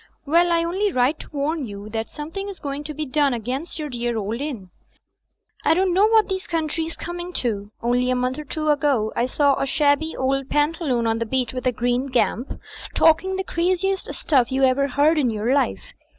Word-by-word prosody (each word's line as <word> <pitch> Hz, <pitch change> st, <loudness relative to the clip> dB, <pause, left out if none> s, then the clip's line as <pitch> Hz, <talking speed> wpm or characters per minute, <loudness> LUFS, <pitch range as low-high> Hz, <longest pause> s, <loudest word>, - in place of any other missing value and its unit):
Well, 340 Hz, +4 st, +3 dB
I 335 Hz, 0 st, +3 dB
only 385 Hz, +4 st, 0 dB
write 255 Hz, +2 st, +1 dB
to -, -, -9 dB
warn 295 Hz, -1 st, -2 dB
you 200 Hz, 0 st, -8 dB
that 225 Hz, 0 st, -3 dB
something 330 Hz, +7 st, -6 dB
is 390 Hz, -, -8 dB
going 285 Hz, 0 st, -4 dB
to 305 Hz, -, -4 dB
be 305 Hz, +1 st, -3 dB
done 285 Hz, -1 st, +2 dB
against 260 Hz, +10 st, -4 dB
your 305 Hz, -2 st, -3 dB
dear 240 Hz, -3 st, -2 dB
old 220 Hz, +4 st, -3 dB
inn. 235 Hz, -12 st, -5 dB, 0.9 s
I -, -, +4 dB
don't 370 Hz, 0 st, +2 dB
know 395 Hz, +4 st, +5 dB
what 440 Hz, -2 st, +4 dB
this 380 Hz, +2 st, -3 dB
Coun 320 Hz, -2 st, -1 dB
try's 325 Hz, +1 st, -3 dB
coming 350 Hz, +1 st, -5 dB
to. 210 Hz, -7 st, -2 dB
Only 245 Hz, +1 st, +2 dB
a 255 Hz, -, +2 dB
month 250 Hz, +3 st, -1 dB
or -, -, -5 dB
two 310 Hz, +1 st, -3 dB
ago 280 Hz, -7 st, +2 dB
I 240 Hz, -, +1 dB
saw 280 Hz, +1 st, +2 dB
a 275 Hz, -, 0 dB
shabby 295 Hz, +2 st, +1 dB
old 270 Hz, +1 st, 0 dB
pantaloon 295 Hz, -5 st, +1 dB
on 225 Hz, 0 st, +1 dB
the 230 Hz, -, -2 dB
beach 255 Hz, 0 st, -1 dB
with 255 Hz, 0 st, -3 dB
a -, -, +4 dB
green 245 Hz, +2 st, 0 dB
gamp, 250 Hz, -1 st, -1 dB, 0.4 s
talking 350 Hz, +4 st, +4 dB
the 380 Hz, -, -2 dB
craziest 370 Hz, +2 st, -1 dB
stuff 265 Hz, -5 st, +2 dB
you 265 Hz, +1 st, +1 dB
ever 265 Hz, +2 st, +3 dB
heard 295 Hz, +4 st, +3 dB
in 260 Hz, -4 st, +2 dB
your 220 Hz, +3 st, 0 dB
life. 95 Hz, -, -1 dB
280 Hz, 210 wpm, -23 LUFS, 245-330 Hz, 0.9 s, know